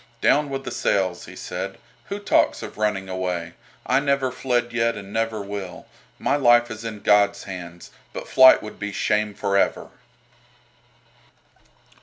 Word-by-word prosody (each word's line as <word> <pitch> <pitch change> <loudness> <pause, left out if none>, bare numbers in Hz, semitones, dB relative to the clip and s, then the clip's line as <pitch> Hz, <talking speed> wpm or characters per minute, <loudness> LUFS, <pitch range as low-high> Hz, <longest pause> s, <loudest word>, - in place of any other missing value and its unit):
"Down 145 0 +3
with 135 0 -4
the 120 - -6
sails!" 95 -6 0
he - - -11
said. - - -5 0.3
"Who 200 - -5
talks 205 - +1
of - - -9
running 105 -3 0
away? 90 -3 -3 0.3
I 130 +2 +3
never 140 -2 0
fled 120 -2 -1
yet 115 0 +1
and 100 0 -9
never 115 -2 -1
will. 100 -2 -7 0.3
My - - +1
life 120 -3 +4
is 110 0 -7
in 110 -2 -6
God's 100 -1 +3
hands, 85 -3 -9 0.2
but - - -7
flight 130 0 +7
would 105 - -9
be 105 0 -4
shame 105 +1 0
for 100 -1 -1
ever." - - 0
105 Hz, 155 wpm, -23 LUFS, 100-120 Hz, 0.3 s, flight